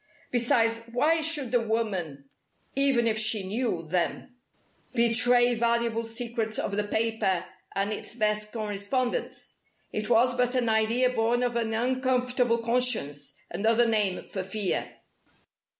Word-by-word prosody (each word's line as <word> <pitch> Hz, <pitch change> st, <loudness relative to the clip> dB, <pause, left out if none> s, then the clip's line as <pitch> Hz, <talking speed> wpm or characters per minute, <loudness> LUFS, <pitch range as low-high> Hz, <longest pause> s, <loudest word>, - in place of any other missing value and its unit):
Besides, 230 Hz, -1 st, +2 dB
why 310 Hz, +7 st, +2 dB
should 300 Hz, -6 st, -2 dB
the 245 Hz, -2 st, +3 dB
woman 190 Hz, -11 st, -2 dB, 0.5 s
even 275 Hz, -3 st, +3 dB
if 220 Hz, -1 st, +1 dB
she 215 Hz, -2 st, +1 dB
knew 200 Hz, -6 st, -2 dB
them 180 Hz, +8 st, -2 dB, 0.6 s
betray 240 Hz, +1 st, +4 dB
valuable 235 Hz, 0 st, 0 dB
secrets 225 Hz, -1 st, -3 dB
of 200 Hz, -, -2 dB
the 210 Hz, 0 st, 0 dB
paper 205 Hz, -5 st, 0 dB, 0.3 s
and 200 Hz, +2 st, 0 dB
its 215 Hz, -, -6 dB
best 210 Hz, -2 st, 0 dB
correspondents? 215 Hz, +3 st, -3 dB, 0.3 s
It 215 Hz, +1 st, -3 dB
was 245 Hz, +2 st, +4 dB
but 250 Hz, +1 st, +1 dB
an 245 Hz, -2 st, +1 dB
idea 225 Hz, +3 st, +2 dB
born 240 Hz, +1 st, +1 dB
of 245 Hz, -1 st, -1 dB
an 225 Hz, -1 st, -1 dB
uncomfortable 250 Hz, -1 st, +1 dB
conscience 230 Hz, -, 0 dB
another 225 Hz, +6 st, +2 dB
name 210 Hz, -5 st, 0 dB
for 190 Hz, -, -5 dB
fear. 190 Hz, +1 st, -2 dB
230 Hz, 130 wpm, -27 LUFS, 215-245 Hz, 0.6 s, betray